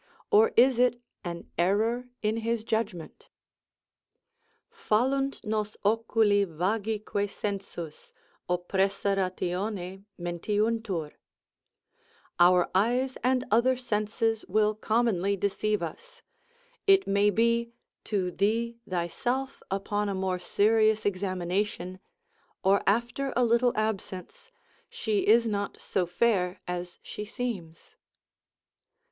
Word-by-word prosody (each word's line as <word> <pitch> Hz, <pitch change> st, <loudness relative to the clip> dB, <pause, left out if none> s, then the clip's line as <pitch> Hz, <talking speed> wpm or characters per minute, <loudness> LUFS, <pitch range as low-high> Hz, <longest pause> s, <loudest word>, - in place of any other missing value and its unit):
or 445 Hz, +2 st, +6 dB
is 255 Hz, -1 st, +6 dB
it 245 Hz, -1 st, +3 dB, 0.2 s
an 170 Hz, -1 st, -6 dB
error 225 Hz, +7 st, +1 dB
in 215 Hz, +1 st, +1 dB
his 230 Hz, 0 st, -1 dB
judgment. 220 Hz, -7 st, -3 dB, 1.4 s
Fallunt 275 Hz, -, 0 dB
nos 215 Hz, 0 st, -2 dB
oculi 220 Hz, -1 st, +3 dB
vagique 205 Hz, +3 st, -1 dB
sensus, 195 Hz, -6 st, -6 dB, 0.4 s
Oppressa 195 Hz, +3 st, +1 dB
ratione 185 Hz, +1 st, -2 dB, 0.2 s
mentiuntur, 190 Hz, -1 st, -1 dB, 1.3 s
our 180 Hz, 0 st, +5 dB
eyes 245 Hz, +7 st, +2 dB
and 255 Hz, 0 st, +2 dB
other 245 Hz, +4 st, +4 dB
senses 225 Hz, -1 st, -1 dB
will 215 Hz, 0 st, +2 dB
commonly 215 Hz, -3 st, +1 dB
deceive 205 Hz, 0 st, 0 dB
us; 470 Hz, -, -8 dB, 0.6 s
it 390 Hz, 0 st, +6 dB
may 200 Hz, +1 st, +3 dB
be, 235 Hz, +3 st, +2 dB, 0.3 s
to 190 Hz, -4 st, -1 dB
thee 230 Hz, +5 st, 0 dB
thyself 240 Hz, +10 st, -2 dB
upon 205 Hz, +1 st, -1 dB
a 195 Hz, -, -2 dB
more 190 Hz, -1 st, -1 dB
serious 215 Hz, +3 st, +3 dB
examination, 185 Hz, -1 st, -2 dB, 0.6 s
or 195 Hz, +1 st, +4 dB
after 235 Hz, +6 st, +1 dB
a 250 Hz, -, +3 dB
little 235 Hz, +1 st, +2 dB
absence, 215 Hz, -, -4 dB, 0.4 s
she 215 Hz, -3 st, -1 dB
is 230 Hz, +2 st, +5 dB
not 205 Hz, -2 st, -2 dB
so 180 Hz, -2 st, -1 dB
fair 180 Hz, -1 st, +1 dB
as 180 Hz, 0 st, -4 dB
she 210 Hz, -, -6 dB
seems. 205 Hz, -8 st, -6 dB
210 Hz, 100 wpm, -28 LUFS, 190-235 Hz, 1.4 s, or